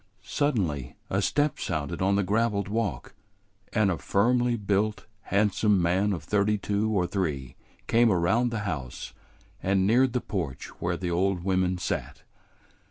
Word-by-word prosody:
Suddenly 90 - -1 0.2
a - - +1
step 145 0 +1
sounded 75 +3 -3
on 95 +1 +3
the 100 - +2
graveled 105 0 +1
walk, 100 - -2 0.6
and 105 -4 +2
a 85 - -3
firmly 120 +4 +2
built, 105 +1 0 0.2
handsome 105 0 +2
man 90 +4 +2
of 85 -6 -3
thirty 105 +4 +1
two 105 +1 -1
or 100 -5 +1
three 75 -9 -3 0.3
came 115 0 +4
around 95 +7 +2
the 115 -3 -3
house 75 -12 -5 0.5
and 95 0 +2
neared 120 +4 +3
the 125 - +1
porch 85 - -4
where 85 0 -1
the 90 -1 -3
old 90 0 0
women 95 -1 +1
sat. 90 - -4
100 Hz, 150 wpm, -27 LUFS, 90-110 Hz, 0.6 s, came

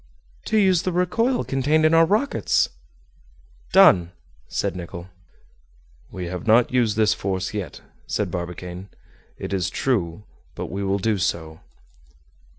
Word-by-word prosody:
"To 220 - +1
use 190 -5 +4
the 185 - -2
recoil 225 +9 +1
contained 145 +4 +1
in 155 - +4
our 165 0 +6
rockets." 215 +9 +1 1.0
"Done!" 90 - +6 0.3
said - - -2
Nicholl. 85 0 -8 1.0
"We 90 -1 -6
have 90 +2 -6
not 115 +3 +4
used 115 -4 +2
this 110 -1 +4
force 95 0 -3
yet," 100 -8 -5 0.3
said - - -2
Barbicane, 90 +2 -6 0.5
"it - - -5
is 95 -2 0
true, 100 -8 -1 0.3
but - - -6
we 100 +2 -3
will 100 0 0
do 105 +1 0
so." 80 -3 -2
105 Hz, 135 wpm, -23 LUFS, -, 1.0 s, our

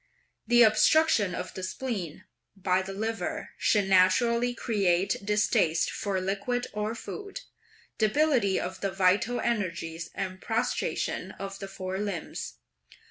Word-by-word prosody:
The 240 +1 +7
obstruction 220 - +4
of - - -5
the 185 - -6
spleen 190 - -4 0.3
by 185 -1 +1
the 190 +1 -6
liver 220 +3 -3
should 205 -3 +2
naturally 235 +6 +4
create 195 -6 +1
distaste 200 -6 +2
for 195 -2 -2
liquid 200 +6 -1
or 210 +2 -2
food, 405 - -7 0.6
debility 235 -3 +2
of 185 +1 -5
the 195 - 0
vital 195 +5 +2
energies 170 -7 -2
and 185 -1 -4
prostration 230 +2 -2
of 195 0 -7
the 195 - -6
four 190 0 -5
limbs. 200 -5 -4
200 Hz, 125 wpm, -28 LUFS, 185-235 Hz, 0.6 s, The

